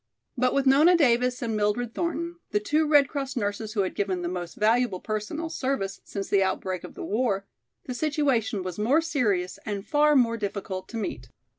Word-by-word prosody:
But 255 Hz, -1 st, +1 dB
with 275 Hz, 0 st, +2 dB
Nona 300 Hz, +7 st, +6 dB
Davis 250 Hz, -3 st, +2 dB
and 225 Hz, -2 st, -1 dB
Mildred 215 Hz, +3 st, 0 dB
Thornton, 340 Hz, 0 st, -3 dB
the 210 Hz, -, +1 dB
two 300 Hz, +9 st, +1 dB
Red 290 Hz, -2 st, +5 dB
Cross 275 Hz, -1 st, -4 dB
nurses 210 Hz, -1 st, -2 dB
who 210 Hz, -, +1 dB
had 190 Hz, -, -1 dB
given 190 Hz, -3 st, -1 dB
the -, -, -1 dB
most 175 Hz, -1 st, -5 dB
valuable 220 Hz, -2 st, +2 dB
personal 215 Hz, -, -3 dB
service, 260 Hz, -11 st, -2 dB
since 200 Hz, -1 st, -5 dB
the 200 Hz, -, +3 dB
outbreak 190 Hz, -1 st, -1 dB
of -, -, -10 dB
the -, -, -6 dB
war, 205 Hz, -3 st, 0 dB, 0.4 s
the 255 Hz, -, -5 dB
situation 260 Hz, -8 st, 0 dB
was 185 Hz, +1 st, -5 dB
more 260 Hz, +10 st, +3 dB
serious 205 Hz, -, 0 dB
and 205 Hz, -1 st, -4 dB
far 300 Hz, 0 st, +3 dB
more 230 Hz, -3 st, +3 dB
difficult 195 Hz, -3 st, -4 dB
to 230 Hz, -, -5 dB
meet. 130 Hz, -, -4 dB
230 Hz, 190 wpm, -26 LUFS, 200-275 Hz, 0.4 s, Nona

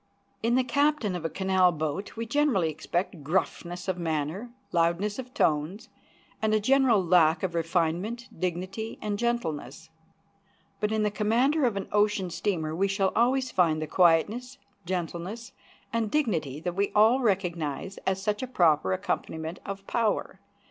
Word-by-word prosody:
In 235 Hz, +2 st, +2 dB
the 260 Hz, -, +3 dB
captain 285 Hz, -7 st, +1 dB
of 170 Hz, -2 st, -5 dB
a -, -, 0 dB
canal 190 Hz, 0 st, +3 dB
boat 160 Hz, +4 st, -4 dB
we 230 Hz, -, -2 dB
generally 230 Hz, -, +2 dB
expect 170 Hz, +1 st, -3 dB
gruffness 175 Hz, +2 st, -2 dB
of 185 Hz, -1 st, -1 dB
manner, 160 Hz, +7 st, -2 dB, 0.2 s
loudness 175 Hz, +6 st, +1 dB
of 255 Hz, -1 st, -7 dB
tones, 160 Hz, +4 st, 0 dB, 0.5 s
and 215 Hz, 0 st, +2 dB
a -, -, +3 dB
general 250 Hz, -2 st, +4 dB
lack 165 Hz, -1 st, +4 dB
of 185 Hz, -3 st, -1 dB
refinement, 175 Hz, +8 st, -1 dB
dignity, 185 Hz, +5 st, -4 dB
and 205 Hz, -1 st, -3 dB
gentleness; 165 Hz, -, -3 dB, 0.9 s
but 210 Hz, 0 st, 0 dB
in 220 Hz, -1 st, +1 dB
the 210 Hz, -, +1 dB
commander 245 Hz, +8 st, +2 dB
of 225 Hz, -5 st, 0 dB
an 195 Hz, -, -4 dB
ocean 205 Hz, -3 st, +1 dB
steamer 165 Hz, -3 st, -2 dB
we 195 Hz, +4 st, +2 dB
shall 195 Hz, -1 st, +1 dB
always 255 Hz, +2 st, +2 dB
find 165 Hz, -6 st, +2 dB
the 155 Hz, -, -2 dB
quietness, 195 Hz, -, +2 dB, 0.3 s
gentleness, 185 Hz, +7 st, -4 dB, 0.4 s
and 230 Hz, -2 st, 0 dB
dignity 170 Hz, -, 0 dB
that 175 Hz, +2 st, -3 dB
we 200 Hz, +2 st, 0 dB
all 220 Hz, +5 st, +5 dB
recognize 185 Hz, -, -1 dB
as 190 Hz, 0 st, +1 dB
such 210 Hz, +2 st, -1 dB
a 260 Hz, -, -3 dB
proper 160 Hz, -, +3 dB
accompaniment 160 Hz, -, -3 dB
of 195 Hz, 0 st, -6 dB
power. 225 Hz, -1 st, -1 dB
190 Hz, 155 wpm, -27 LUFS, 165-225 Hz, 0.9 s, all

